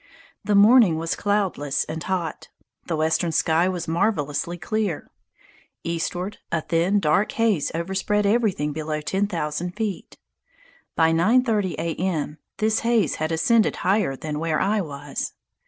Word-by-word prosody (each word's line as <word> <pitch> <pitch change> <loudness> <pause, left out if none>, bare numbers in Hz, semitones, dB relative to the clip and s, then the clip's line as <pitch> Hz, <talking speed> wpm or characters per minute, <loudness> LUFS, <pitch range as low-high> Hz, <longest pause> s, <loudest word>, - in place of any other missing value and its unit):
The 210 - +1
morning 205 -4 +6
was 165 0 -2
cloudless 195 -9 0
and 155 +1 -6
hot. 175 -4 -3 0.4
The 165 - -1
western 160 +2 +1
sky 165 +3 +2
was 175 -2 -4
marvelously 165 -3 -1
clear. 200 -1 -2 0.7
Eastward, 175 +4 -3
a 165 - 0
thin, 175 +6 +1
dark 160 +4 +1
haze 220 -10 +1
overspread 190 +4 0
everything 200 -9 +1
below 155 0 -3
ten 195 +6 0
thousand 170 -1 -3
feet. 210 -4 -4 0.8
By 160 0 +4
9.30 210 +1 +2
A. 165 0 -2
M. 160 -4 -2 0.2
this 220 0 +1
haze 230 -8 +1
had 155 +1 0
ascended 210 +8 +3
higher 190 -7 +2
than 150 +2 -5
where 160 -1 0
I 205 +2 +1
was. 145 -4 -5
175 Hz, 140 wpm, -23 LUFS, 160-205 Hz, 0.8 s, morning